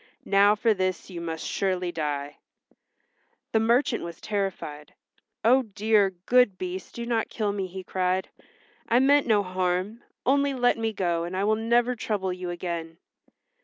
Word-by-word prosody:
Now 200 Hz, +1 st, +5 dB
for 220 Hz, +1 st, +2 dB
this 185 Hz, -1 st, -2 dB
you 170 Hz, -2 st, -6 dB
must 165 Hz, -1 st, -4 dB
surely 185 Hz, -2 st, -1 dB
die." 145 Hz, -3 st, -3 dB, 1.1 s
The 220 Hz, -, +3 dB
merchant 235 Hz, +2 st, +2 dB
was 170 Hz, -1 st, -7 dB
terrified. 190 Hz, -8 st, -4 dB, 0.5 s
"Oh, 255 Hz, +3 st, +6 dB
dear, 210 Hz, -2 st, +2 dB, 0.2 s
good 250 Hz, -6 st, +4 dB
Beast 185 Hz, 0 st, -6 dB
do 235 Hz, -, -4 dB
not 230 Hz, -2 st, 0 dB
kill 210 Hz, -3 st, -1 dB
me!" 195 Hz, -2 st, -3 dB
he 185 Hz, +1 st, -8 dB
cried. 185 Hz, 0 st, -1 dB, 0.6 s
"I 235 Hz, -, +4 dB
meant 280 Hz, +2 st, +4 dB
no 210 Hz, -3 st, +3 dB
harm. 185 Hz, +4 st, -1 dB, 0.2 s
Only 280 Hz, +1 st, +2 dB
let 245 Hz, -2 st, +2 dB
me 225 Hz, 0 st, 0 dB
go, 175 Hz, -5 st, -1 dB
and 175 Hz, +2 st, -4 dB
I 195 Hz, -, 0 dB
will 215 Hz, +2 st, +3 dB
never 235 Hz, +3 st, +2 dB
trouble 200 Hz, -5 st, -2 dB
you 180 Hz, 0 st, -5 dB
again." 170 Hz, -2 st, -5 dB
195 Hz, 160 wpm, -26 LUFS, 180-225 Hz, 1.1 s, Oh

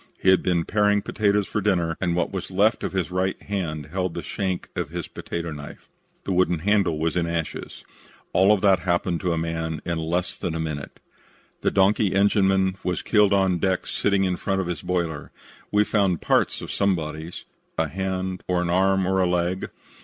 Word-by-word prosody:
He 95 Hz, -, +2 dB
had 95 Hz, -, +5 dB
been 85 Hz, -3 st, +1 dB
paring 105 Hz, -1 st, +2 dB
potatoes 105 Hz, -1 st, +1 dB
for 105 Hz, -, -2 dB
dinner 85 Hz, -5 st, +1 dB
and 85 Hz, -2 st, +1 dB
what 90 Hz, -, 0 dB
was 95 Hz, -2 st, -4 dB
left 100 Hz, +4 st, +2 dB
of -, -, -2 dB
his 95 Hz, -2 st, -2 dB
right 95 Hz, +1 st, -1 dB
hand 80 Hz, -7 st, -4 dB
held 90 Hz, -1 st, -2 dB
the -, -, -4 dB
shank 95 Hz, -2 st, -3 dB
of 90 Hz, -6 st, -2 dB
his 85 Hz, 0 st, -5 dB
potato 85 Hz, -1 st, -5 dB
knife. 75 Hz, -1 st, -9 dB, 0.4 s
The -, -, -3 dB
wooden 90 Hz, -1 st, +2 dB
handle 95 Hz, -2 st, +2 dB
was 80 Hz, 0 st, -1 dB
in 85 Hz, -1 st, +1 dB
ashes. 85 Hz, -1 st, -4 dB, 0.5 s
All 100 Hz, +3 st, +5 dB
that 95 Hz, -2 st, +4 dB
happened 85 Hz, -1 st, 0 dB
to 90 Hz, -2 st, 0 dB
a 85 Hz, -, 0 dB
man 80 Hz, -1 st, -2 dB
in 85 Hz, -1 st, -1 dB
less 85 Hz, +3 st, -1 dB
than 85 Hz, -3 st, -3 dB
a -, -, -2 dB
minute. 75 Hz, -3 st, -5 dB, 0.6 s
The -, -, +2 dB
donkey 100 Hz, +1 st, +3 dB
engineman 95 Hz, -1 st, +3 dB
was 90 Hz, -1 st, -2 dB
killed 105 Hz, -2 st, +4 dB
on 95 Hz, -3 st, +3 dB
deck 95 Hz, +1 st, 0 dB
sitting 100 Hz, -1 st, +1 dB
in 90 Hz, -2 st, 0 dB
front 95 Hz, -1 st, -1 dB
of 95 Hz, -, -1 dB
his 85 Hz, -1 st, -4 dB
boiler. 85 Hz, -5 st, -2 dB, 0.4 s
We 105 Hz, 0 st, +4 dB
found 100 Hz, -5 st, +1 dB
parts -, -, +1 dB
of -, -, -6 dB
some 100 Hz, -1 st, +2 dB
bodies 80 Hz, +1 st, -6 dB, 0.3 s
a 80 Hz, -, +1 dB
hand, 95 Hz, +2 st, -3 dB
or 90 Hz, -1 st, +1 dB
an 85 Hz, -, -1 dB
arm 95 Hz, +1 st, +3 dB
or 95 Hz, +1 st, +1 dB
a 90 Hz, -, +3 dB
leg. 90 Hz, +1 st, -1 dB
90 Hz, 200 wpm, -24 LUFS, 85-95 Hz, 0.6 s, had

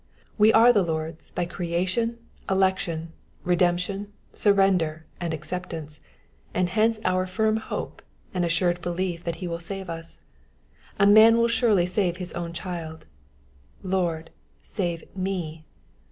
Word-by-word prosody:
We 215 Hz, +1 st, +6 dB
are 235 Hz, +2 st, +7 dB
the 205 Hz, -, +4 dB
Lord's 160 Hz, -2 st, -3 dB
by 175 Hz, -, -2 dB
creation, 185 Hz, +7 st, -1 dB, 0.3 s
election, 190 Hz, -4 st, 0 dB, 0.3 s
redemption, 180 Hz, +3 st, 0 dB, 0.2 s
surrender, 185 Hz, -6 st, +2 dB
and 170 Hz, -2 st, -2 dB
acceptance; 160 Hz, -1 st, -5 dB, 0.6 s
and 180 Hz, -1 st, +1 dB
hence 220 Hz, +3 st, +2 dB
our 185 Hz, 0 st, +1 dB
firm 220 Hz, +3 st, +1 dB
hope 220 Hz, -, -5 dB, 0.3 s
and 180 Hz, -2 st, 0 dB
assured 175 Hz, +1 st, +1 dB
belief 175 Hz, -1 st, -2 dB
that 170 Hz, 0 st, -4 dB
ho 180 Hz, -, -3 dB
will 170 Hz, 0 st, -3 dB
save 190 Hz, +1 st, -6 dB
iis. 165 Hz, 0 st, -8 dB, 0.8 s
A 200 Hz, -, +4 dB
man 220 Hz, +3 st, +8 dB
will 235 Hz, 0 st, +4 dB
surely 225 Hz, -6 st, +3 dB
save 180 Hz, -1 st, 0 dB
his 180 Hz, -1 st, -6 dB
own 170 Hz, -1 st, -4 dB
child: 170 Hz, -2 st, -6 dB, 0.8 s
Lord, 175 Hz, -4 st, -1 dB, 0.3 s
save 175 Hz, -5 st, -3 dB
me. 175 Hz, -5 st, -3 dB
180 Hz, 130 wpm, -25 LUFS, 170-195 Hz, 0.8 s, man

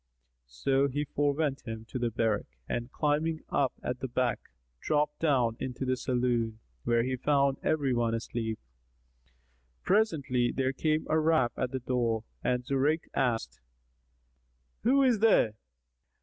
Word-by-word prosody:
So 135 Hz, -, +1 dB
he 145 Hz, +2 st, -2 dB
forewent 145 Hz, 0 st, 0 dB
him 110 Hz, 0 st, -5 dB
to 130 Hz, -, -4 dB
the 120 Hz, -1 st, 0 dB
barrack 110 Hz, -2 st, 0 dB, 0.2 s
and, 120 Hz, +2 st, -3 dB
climbing 155 Hz, +2 st, 0 dB
up 135 Hz, -3 st, +1 dB
at 125 Hz, 0 st, -3 dB
the 130 Hz, -, -3 dB
back, 125 Hz, -1 st, -1 dB, 0.3 s
dropped 150 Hz, -, 0 dB
down 130 Hz, -8 st, +2 dB
into 130 Hz, +1 st, -4 dB
the 130 Hz, 0 st, +1 dB
saloon, 120 Hz, -3 st, 0 dB, 0.3 s
where 115 Hz, 0 st, +3 dB
he 130 Hz, +1 st, -1 dB
found 140 Hz, +1 st, +2 dB
every 145 Hz, -4 st, +1 dB
one 115 Hz, -1 st, +1 dB
asleep. 115 Hz, -1 st, -3 dB, 1.3 s
Presently 145 Hz, -, +2 dB
there 130 Hz, 0 st, 0 dB
came 155 Hz, +3 st, 0 dB
a 160 Hz, -, +2 dB
rap 155 Hz, -6 st, +2 dB
at 125 Hz, -, -1 dB
the 130 Hz, +1 st, -3 dB
door 120 Hz, -3 st, 0 dB, 0.2 s
and 125 Hz, 0 st, 0 dB
Zurayk 140 Hz, +5 st, +1 dB
asked, 115 Hz, -, -1 dB, 1.2 s
"Who 270 Hz, +5 st, +4 dB
is 245 Hz, -5 st, +3 dB
there!" 210 Hz, -, +4 dB
130 Hz, 140 wpm, -30 LUFS, 120-150 Hz, 1.3 s, Who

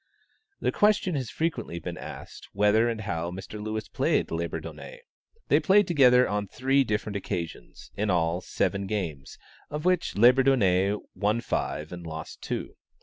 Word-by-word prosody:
The -, -, 0 dB
question 210 Hz, -3 st, +2 dB
has 130 Hz, -6 st, -2 dB
frequently 160 Hz, -, -2 dB
been 85 Hz, -, -5 dB
asked, -, -, -9 dB
whether 105 Hz, +3 st, +3 dB
and 115 Hz, -2 st, -3 dB
how 85 Hz, -5 st, -3 dB
Mr. 95 Hz, +4 st, -7 dB
Lewis 110 Hz, 0 st, -3 dB
played -, -, 0 dB
Labourdonnais? 85 Hz, -, -5 dB, 0.5 s
They -, -, +4 dB
played 205 Hz, 0 st, +4 dB
together 125 Hz, -6 st, +5 dB
on 105 Hz, 0 st, -2 dB
three 135 Hz, +5 st, +2 dB
different 105 Hz, -2 st, -2 dB
occasions, 85 Hz, -4 st, -6 dB
in 105 Hz, +1 st, -1 dB
all 85 Hz, -1 st, +1 dB
seven 100 Hz, +1 st, -1 dB
games, 85 Hz, -10 st, -4 dB, 0.3 s
of 150 Hz, +2 st, -5 dB
which 180 Hz, -2 st, +1 dB
Labourdonnais 110 Hz, -6 st, +4 dB, 0.2 s
won 105 Hz, +3 st, 0 dB
five 75 Hz, -9 st, -3 dB
and 85 Hz, -1 st, -7 dB
lost 80 Hz, -1 st, -7 dB
two. -, -, -5 dB
105 Hz, 145 wpm, -27 LUFS, 90-135 Hz, 0.5 s, together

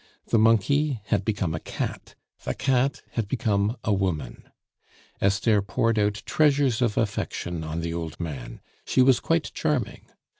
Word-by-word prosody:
The 115 Hz, -, +4 dB
monkey 115 Hz, +5 st, +3 dB
had 100 Hz, -1 st, 0 dB
become 95 Hz, -5 st, -1 dB
a 80 Hz, -, -2 dB
cat, -, -, -5 dB, 0.3 s
the -, -, -2 dB
cat 135 Hz, 0 st, +1 dB
had 115 Hz, -4 st, -2 dB
become 105 Hz, -1 st, 0 dB
a 105 Hz, -, +1 dB
woman. 90 Hz, -10 st, -2 dB, 0.7 s
Esther 100 Hz, +2 st, +3 dB
poured 110 Hz, +3 st, 0 dB
out 105 Hz, +1 st, 0 dB
treasures 140 Hz, -5 st, +2 dB
of 115 Hz, -4 st, +1 dB
affection 85 Hz, -2 st, -2 dB
on 80 Hz, +1 st, -3 dB
the 85 Hz, 0 st, -3 dB
old 85 Hz, -2 st, -5 dB
man; 70 Hz, -8 st, -6 dB, 0.2 s
she 130 Hz, -, +3 dB
was 130 Hz, -2 st, +5 dB
quite 165 Hz, -1 st, 0 dB
charming. 145 Hz, -7 st, -2 dB
105 Hz, 150 wpm, -25 LUFS, 90-125 Hz, 0.7 s, was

